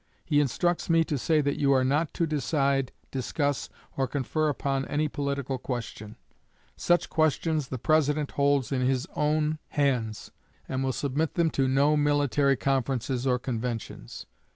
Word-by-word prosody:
He 145 Hz, -2 st, +2 dB
instructs 170 Hz, +6 st, 0 dB
me 165 Hz, 0 st, +5 dB
to 155 Hz, -, -2 dB
say 155 Hz, +3 st, +2 dB
that 140 Hz, 0 st, -1 dB
you 140 Hz, -1 st, +3 dB
are 130 Hz, -1 st, +3 dB
not 145 Hz, +4 st, +1 dB
to 170 Hz, -, +1 dB
decide, 140 Hz, -3 st, 0 dB, 0.2 s
discuss, 140 Hz, +2 st, -1 dB, 0.3 s
or 135 Hz, -1 st, 0 dB
confer 150 Hz, +3 st, -1 dB
upon 135 Hz, -1 st, -1 dB
any 150 Hz, +1 st, 0 dB
political 140 Hz, -2 st, -3 dB
question. 115 Hz, -4 st, -6 dB, 0.6 s
Such 175 Hz, 0 st, +2 dB
questions 155 Hz, -1 st, +1 dB
the 130 Hz, -, -4 dB
President 150 Hz, +2 st, +1 dB
holds 140 Hz, -4 st, +1 dB
in 130 Hz, -2 st, 0 dB
his 130 Hz, 0 st, 0 dB
own 150 Hz, +1 st, +1 dB
hands, 125 Hz, -7 st, -1 dB, 0.4 s
and 130 Hz, 0 st, -2 dB
will 130 Hz, -, +1 dB
submit 145 Hz, +4 st, -1 dB
them 170 Hz, -2 st, +2 dB
to 135 Hz, -1 st, +1 dB
no 140 Hz, +3 st, +3 dB
military 145 Hz, -1 st, +2 dB
conferences 130 Hz, -1 st, -1 dB
or 125 Hz, -1 st, +3 dB
conventions." 120 Hz, -2 st, -5 dB
140 Hz, 155 wpm, -27 LUFS, 130-150 Hz, 0.6 s, me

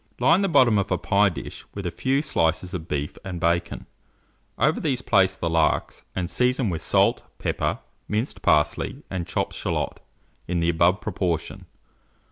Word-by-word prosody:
Line 160 Hz, +10 st, +4 dB
the 195 Hz, -, +1 dB
bottom 120 Hz, -9 st, +5 dB
of 100 Hz, -, -1 dB
a -, -, +1 dB
pie 100 Hz, 0 st, +3 dB
dish 85 Hz, -, -8 dB
with 100 Hz, -2 st, -5 dB
a 90 Hz, -, -1 dB
few 135 Hz, -, 0 dB
slices 85 Hz, -, 0 dB
of 85 Hz, -3 st, -5 dB
beef 75 Hz, -2 st, -3 dB
and 90 Hz, -3 st, -5 dB
bacon; 85 Hz, 0 st, 0 dB, 0.7 s
over 155 Hz, +3 st, +2 dB
these 130 Hz, -5 st, -1 dB
place 95 Hz, -3 st, +3 dB
the 85 Hz, -, -3 dB
larks, 80 Hz, -1 st, 0 dB
and 90 Hz, -2 st, -1 dB
season 125 Hz, 0 st, +1 dB
with 80 Hz, -, -3 dB
salt, -, -, +3 dB, 0.2 s
pepper, -, -, -1 dB, 0.3 s
minced 110 Hz, +5 st, -2 dB
parsley, 75 Hz, -1 st, +1 dB
and 90 Hz, -2 st, -3 dB
chopped -, -, -2 dB
shalot, -, -, -2 dB, 0.5 s
in 90 Hz, 0 st, 0 dB
the 85 Hz, 0 st, +1 dB
above 85 Hz, +3 st, +3 dB
proportion. 90 Hz, -5 st, -3 dB
95 Hz, 165 wpm, -24 LUFS, 85-120 Hz, 0.7 s, bottom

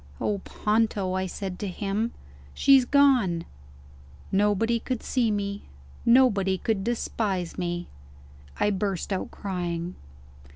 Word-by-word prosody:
"Oh, 205 Hz, -1 st, 0 dB
Ponto!" 210 Hz, -2 st, 0 dB
I 190 Hz, 0 st, -1 dB
said 185 Hz, 0 st, -5 dB
to 205 Hz, -, -3 dB
him, 205 Hz, +4 st, -2 dB, 0.4 s
"she's 270 Hz, -2 st, +6 dB
gone!" 245 Hz, -12 st, +3 dB, 0.9 s
Nobody 210 Hz, +4 st, +2 dB
could 250 Hz, 0 st, -4 dB
see 245 Hz, -3 st, +1 dB
me; 200 Hz, -1 st, -2 dB, 0.4 s
nobody 210 Hz, -6 st, +4 dB
could 205 Hz, 0 st, -1 dB
despise 205 Hz, -6 st, -2 dB
me 175 Hz, -1 st, -3 dB, 0.7 s
I 210 Hz, -, +3 dB
burst 195 Hz, -1 st, -2 dB
out 190 Hz, -, -3 dB
crying. 175 Hz, -3 st, -4 dB
200 Hz, 115 wpm, -26 LUFS, 185-225 Hz, 0.9 s, she's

